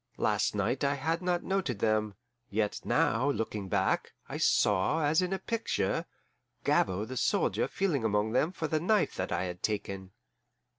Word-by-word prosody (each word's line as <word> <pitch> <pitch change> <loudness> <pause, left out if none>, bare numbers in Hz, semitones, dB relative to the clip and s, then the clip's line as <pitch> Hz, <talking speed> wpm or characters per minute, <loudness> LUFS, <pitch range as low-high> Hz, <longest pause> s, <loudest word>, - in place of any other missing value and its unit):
Last - - +1
night 130 +3 0
I 140 0 +2
had 160 +5 -1
not 180 -1 0
noted 190 - -1
them, 110 -1 +1 0.3
yet 105 0 -1
now, 125 +6 +2
looking 105 -7 -2
back, - - 0
I - - -5
saw, 105 +11 +3
as 155 +4 +3
in 180 0 -1
a 195 - 0
picture, 230 +3 -1 0.6
Gabord 100 +5 +1
the 130 - -5
soldier - - +1
feeling 170 -11 0
among 105 0 +1
them 150 +8 +2
for 165 -4 -3
the 155 +1 0
knife 200 +4 +2
that 95 - -2
I 85 +1 0
had 90 -1 -5
taken. 100 -3 -3
125 Hz, 165 wpm, -30 LUFS, 105-165 Hz, 0.6 s, saw